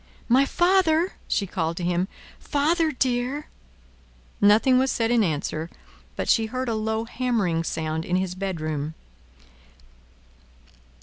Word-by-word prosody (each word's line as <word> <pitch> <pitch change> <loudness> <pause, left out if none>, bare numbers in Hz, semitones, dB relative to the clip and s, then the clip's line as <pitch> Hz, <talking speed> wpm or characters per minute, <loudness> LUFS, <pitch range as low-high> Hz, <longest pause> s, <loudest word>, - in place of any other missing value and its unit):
"My 260 +3 +5
father!" 350 0 +3
she 200 - 0
called 170 -3 -2
to 180 - -4
him. 175 +1 0 0.3
"Father 315 +3 +1
dear!" 255 +2 -1 1.0
Nothing 225 +6 +5
was 265 +1 +2
said 230 0 0
in 235 -2 +4
answer, 160 -1 -2 0.5
but - - -3
she 225 -1 +3
heard 255 +3 -3
a - - 0
low 220 +1 -1
hammering 225 -10 0
sound 160 -1 -2
in 180 - -1
his 185 -1 -1
bedroom. 155 -5 -3
220 Hz, 125 wpm, -24 LUFS, 175-260 Hz, 1.0 s, My